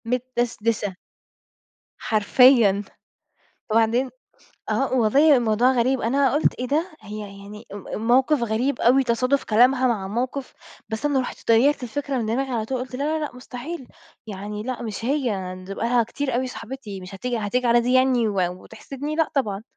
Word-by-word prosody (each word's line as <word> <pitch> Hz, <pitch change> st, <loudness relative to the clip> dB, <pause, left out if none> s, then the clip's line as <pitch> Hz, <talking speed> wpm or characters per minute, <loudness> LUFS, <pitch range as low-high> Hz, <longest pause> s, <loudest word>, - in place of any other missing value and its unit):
متدشدشة. 230 Hz, -4 st, -1 dB, 1.0 s
حرفيًا، 215 Hz, -1 st, +4 dB, 0.9 s
وبعدين 230 Hz, +4 st, +2 dB, 0.6 s
آه 270 Hz, -1 st, 0 dB
والله 270 Hz, +6 st, +5 dB
الموضوع 235 Hz, +1 st, +3 dB
غريب 260 Hz, +1 st, +1 dB
أنا 270 Hz, +4 st, +2 dB
قُلت 295 Hz, -, +2 dB
إيه 250 Hz, -, -2 dB
ده 315 Hz, +7 st, 0 dB
هي 210 Hz, 0 st, -7 dB, 0.2 s
يعني 210 Hz, +2 st, -11 dB
أم 205 Hz, -, -9 dB
الموقف 250 Hz, +5 st, +2 dB
غريب 235 Hz, +4 st, -1 dB
أوي 260 Hz, +3 st, +5 dB
تصادُف 255 Hz, +3 st, +1 dB
كلامها 250 Hz, +4 st, +4 dB
مع 215 Hz, -6 st, -1 dB
الموقف 250 Hz, +6 st, -3 dB, 0.4 s
بس 220 Hz, +4 st, -4 dB
أنا 285 Hz, -2 st, +2 dB
رُحت 250 Hz, -, -6 dB
طيّرت 255 Hz, +5 st, +4 dB
الفكرة 275 Hz, +2 st, -3 dB
من 235 Hz, -, -1 dB
دماغي 260 Hz, +5 st, -1 dB
على 225 Hz, -3 st, -1 dB
طول 260 Hz, +3 st, -2 dB
وقُلت 250 Hz, 0 st, -6 dB
لا، 275 Hz, -, -3 dB, 0.2 s
لا، 305 Hz, -, -1 dB
لأ 275 Hz, -, -9 dB
مستحيل 250 Hz, +3 st, -8 dB, 0.4 s
يعني 210 Hz, +1 st, -6 dB
لأ 250 Hz, 0 st, -4 dB
مش 225 Hz, -1 st, -5 dB
هي 230 Hz, -10 st, -1 dB
ن 185 Hz, -, -11 dB
دي 195 Hz, +2 st, -7 dB
بقى 220 Hz, -, -3 dB
لها 240 Hz, 0 st, +3 dB
كتير 265 Hz, +2 st, -3 dB
أوي 255 Hz, +1 st, 0 dB
صاحبتي 230 Hz, -5 st, -8 dB
مش 185 Hz, +2 st, -9 dB
هتيجي 245 Hz, +5 st, -3 dB
هتيجي 240 Hz, +4 st, -1 dB
على 235 Hz, 0 st, +5 dB
دي 245 Hz, +2 st, 0 dB
يعني 255 Hz, -3 st, +3 dB
و 200 Hz, -3 st, 0 dB, 0.2 s
وتحسدني 275 Hz, +7 st, -7 dB
لأ 320 Hz, -1 st, +1 dB
طبعًا. 210 Hz, -7 st, -1 dB
245 Hz, 170 wpm, -23 LUFS, 220-265 Hz, 1.0 s, والله